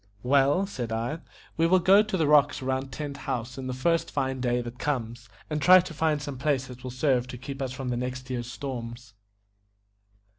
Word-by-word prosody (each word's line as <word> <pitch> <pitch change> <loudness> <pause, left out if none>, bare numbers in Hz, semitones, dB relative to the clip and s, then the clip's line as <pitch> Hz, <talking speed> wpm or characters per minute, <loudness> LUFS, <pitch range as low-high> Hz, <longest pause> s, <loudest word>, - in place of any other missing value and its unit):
"Well," 140 +7 +3
said 125 - -5
I, 115 +8 -2 0.4
"we 165 +1 +3
will 185 +2 +5
go 190 +3 +6
to 215 -3 -2
the 160 - +2
rocks 145 -2 +4
round 130 +1 -2
Tent 145 +1 -5
House 120 +1 -4
the 130 -1 -5
first 165 +6 0
fine 130 -1 -2
day 120 -1 +1
that 120 +1 -7
comes, 120 -4 -3 0.2
and 150 -1 -2
try 185 +4 +8
to 180 -2 -4
find 155 -1 +1
some 145 -3 -6
place 135 -2 +1
that 125 -1 -11
will 130 - -5
serve 130 -1 +1
to 125 - -7
keep 135 +2 -7
us 130 -2 -2
from 130 0 -5
the 120 - -1
next 130 +1 -4
year's 120 -2 -4
storms." 120 -3 -6
130 Hz, 200 wpm, -27 LUFS, 125-150 Hz, 0.4 s, try